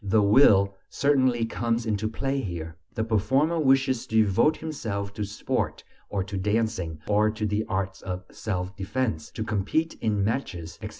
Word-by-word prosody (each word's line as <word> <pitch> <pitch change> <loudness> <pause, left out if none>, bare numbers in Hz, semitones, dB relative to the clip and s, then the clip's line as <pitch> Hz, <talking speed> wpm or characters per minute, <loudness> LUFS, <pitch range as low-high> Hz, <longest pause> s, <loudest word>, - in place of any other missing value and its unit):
The 100 +1 +3
will 100 -3 +6 0.2
certainly 130 -5 +2
comes 115 0 -1
into 110 -1 0
play 135 +4 -1
here: 85 -5 -5 0.2
the 110 - 0
performer 130 - +2
wishes 135 -3 +2
to 110 - -4
devote 110 +10 +3
himself 105 -11 -4
to 105 - -3
sport, 100 0 -2 0.3
or 100 -2 -1
to 100 +1 -5
dancing, 105 -5 -1
or 105 +1 +3
to 110 0 -3
the 105 +1 0
arts 95 -1 -3
of 90 -1 -5
self 95 -3 -3
defense, 95 -4 -2
to 110 - -4
compete 110 +10 0
in 105 -3 +1
matches, 90 -7 -3
etc.... - - -5
105 Hz, 165 wpm, -26 LUFS, 100-120 Hz, 0.3 s, will